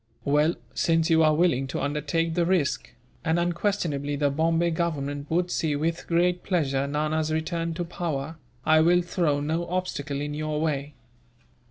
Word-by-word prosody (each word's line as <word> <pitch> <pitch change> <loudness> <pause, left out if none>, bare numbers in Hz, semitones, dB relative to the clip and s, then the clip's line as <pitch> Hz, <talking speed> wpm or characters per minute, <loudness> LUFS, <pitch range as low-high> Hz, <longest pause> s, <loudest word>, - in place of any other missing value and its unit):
"Well, 150 +4 +3 0.2
since 165 0 +2
you 160 0 +5
are 155 -1 +4
willing 145 -6 +2
to 135 - -3
undertake 150 +3 -1
the 175 +1 +2
risk, 165 -9 0 0.3
and 160 0 +1
unquestionably 170 -5 -1
the 145 0 +1
Bombay 165 +3 +1
Government 145 -4 -2
would 175 +2 0
see, 155 -3 0
with 165 +3 -2
great 175 +1 +2
pleasure, 140 -7 0
Nana's 155 +2 0
return 165 +1 -2
to 175 +1 -2
power, 160 -3 -4 0.3
I 155 0 +5
will 175 +2 +4
throw 170 -5 0
no 160 +4 -1
obstacle 150 -6 -2
in 145 +1 -3
your 155 0 -2
way. 150 -2 -2
160 Hz, 160 wpm, -26 LUFS, 145-170 Hz, 0.3 s, you